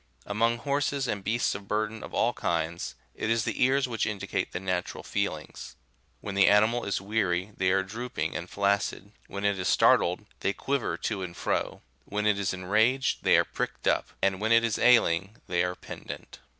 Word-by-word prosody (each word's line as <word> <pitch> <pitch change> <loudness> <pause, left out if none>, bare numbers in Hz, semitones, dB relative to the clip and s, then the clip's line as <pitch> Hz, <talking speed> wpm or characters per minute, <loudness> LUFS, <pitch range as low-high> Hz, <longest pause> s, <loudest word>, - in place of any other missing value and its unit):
Among 115 +3 +1
horses 140 +1 -1
and 100 -4 -2
beasts 115 +4 +1
of 100 0 -8
burden 110 +1 -1
of - - -8
all 120 - +1
kinds, 85 0 -2 0.2
it 110 - -3
is 115 -1 +2
the - - 0
ears 130 +1 +3
which 115 -2 -1
indicate 105 -2 -2
the 90 - -3
natural 90 -1 -3
feelings; - - -4 0.5
when 100 - -5
the 100 0 +5
animal 110 +4 +4
is 100 - -1
weary, 95 -2 -1
they 95 -1 +1
are 95 +1 +3
droop 115 +6 -7
ing - - -1
and 85 +3 -4
flaccid; 100 0 0 0.2
when 100 +1 -5
it 100 -2 +1
is 90 - -1
startled, - - +4
they 100 - 0
quiver 135 +5 -1
to 105 -4 -3
and 85 -2 -6
fro; - - -2 0.2
when 105 +1 -2
it 105 -1 +3
is 100 -1 0
enraged, 110 +8 +1
they - - +5
are - - +3
pricked - - -4
up; - - +2
and 95 0 +2
when 110 +1 +1
it 115 0 +6
is 115 -2 0
ailing, 105 -5 +4
they 90 -1 +1
are 90 0 -2
pendant. - - -9
105 Hz, 195 wpm, -28 LUFS, 95-115 Hz, 0.5 s, it